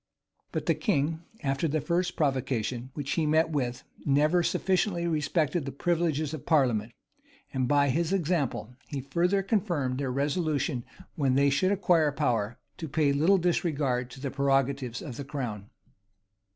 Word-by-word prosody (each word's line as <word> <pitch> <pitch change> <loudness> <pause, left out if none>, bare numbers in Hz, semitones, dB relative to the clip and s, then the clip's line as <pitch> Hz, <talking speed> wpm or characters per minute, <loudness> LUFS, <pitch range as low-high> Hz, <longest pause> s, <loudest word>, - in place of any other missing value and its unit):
[*] - - -47
But - - -3
the - - +3
king, 160 - 0 0.2
after 135 +3 0
the 155 +1 0
first 175 +3 -1
provocation 130 -4 -1
which 145 -2 -4
he 160 -3 +1
met 160 +2 +3
with, 125 -5 -2 0.2
never 150 +5 +3
sufficiently 180 0 +1
respected 155 0 0
the 135 - -4
privileges 160 -1 0
of 155 - -7
parliament; 120 -8 +2 0.6
and, 130 -2 0
by 145 0 +3
his 165 +5 0
example, 160 - -1
he 140 - -4
further 175 +8 +1
confirmed 175 - 0
their 135 -2 -1
resolution, 145 -1 -1 0.3
when 135 -6 +1
they 140 +1 +4
should 165 +8 +2
acquire 175 -6 +3
power, 120 -6 0 0.2
to 160 - -5
pay 145 -1 +2
like 175 +7 +4
disregard 140 -8 0
to 130 - -11
the 135 -1 -3
prerogatives 135 -3 0
of 125 -6 -7
the 140 - -4
crown. 120 -8 -5
145 Hz, 155 wpm, -28 LUFS, 135-170 Hz, 0.6 s, they